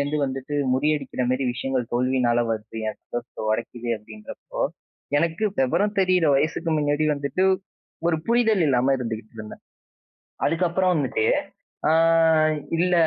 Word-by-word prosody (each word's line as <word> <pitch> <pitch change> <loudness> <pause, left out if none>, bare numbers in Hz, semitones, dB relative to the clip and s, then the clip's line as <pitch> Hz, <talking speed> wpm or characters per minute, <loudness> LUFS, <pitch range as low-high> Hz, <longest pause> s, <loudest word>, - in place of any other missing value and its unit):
இருந்து 145 +2 -1
வந்துட்டு 135 +2 -5 0.2
முறியடிக்கிறமாரி 135 -3 0
விஷயங்கள் 130 -1 -2
தோல்வியினால 125 -1 +2
வருது. 110 0 -4
என் - - -6
சந்தோஷத்த 120 -2 -6
உடைக்குது 120 +2 -3
அப்பிடிங்கிறப்போ 105 0 -10 0.6
எனக்கு 165 +4 -1 0.2
விவரம் 205 +11 +1
தெரியிற 185 -3 +3
வயசுக்கு 160 +4 0
முன்னாடி 145 0 +1
வந்துட்டு 140 +5 -2 0.7
ஒரு 165 - +2
புரிதல் 225 -5 +3
இல்லாம 130 -1 +3
இருந்துகிட்டு 115 -2 -5
இருந்தேன். 105 -1 -9 0.9
அதுக்கப்புறம் 180 +2 +1
வந்துட்டு 130 -7 0 0.6
ஆ - - +4 0.8
இல்ல 180 +2 +1
135 Hz, 115 wpm, -24 LUFS, 120-165 Hz, 0.9 s, ஆ